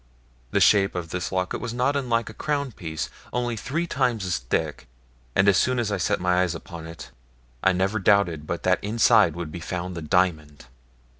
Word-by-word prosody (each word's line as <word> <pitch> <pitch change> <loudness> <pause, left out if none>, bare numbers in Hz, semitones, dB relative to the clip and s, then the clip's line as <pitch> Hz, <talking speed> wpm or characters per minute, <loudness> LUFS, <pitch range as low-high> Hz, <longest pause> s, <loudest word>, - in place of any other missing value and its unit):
The - - +1
shape 100 -2 +4
of 85 -2 -4
this 90 0 -3
locket 95 -1 -2
was 120 -1 -4
not 130 +4 +1
unlike 120 -4 0
a 110 - -7
crown 140 +1 -2
piece, 80 -7 -5 0.2
only 120 -1 -1
three 140 +10 -2
times 125 - 0
as 90 -6 -1
thick, - - -2 0.5
and 95 - +4
as 100 -3 +5
soon 130 +6 +2
as 115 -3 -1
I 100 - 0
set 90 0 -1
eyes 90 -1 +2
upon 80 0 -9
it 80 0 -10 0.5
I 95 - +5
never 95 +4 0
doubted 90 -6 +2
but 85 -1 -3
that 90 0 +2
inside 110 -4 +4
would 85 -3 -5
be 85 - -6
found 90 +2 -4
the 85 - -5
diamond. 80 -4 0
95 Hz, 195 wpm, -25 LUFS, 85-115 Hz, 0.5 s, as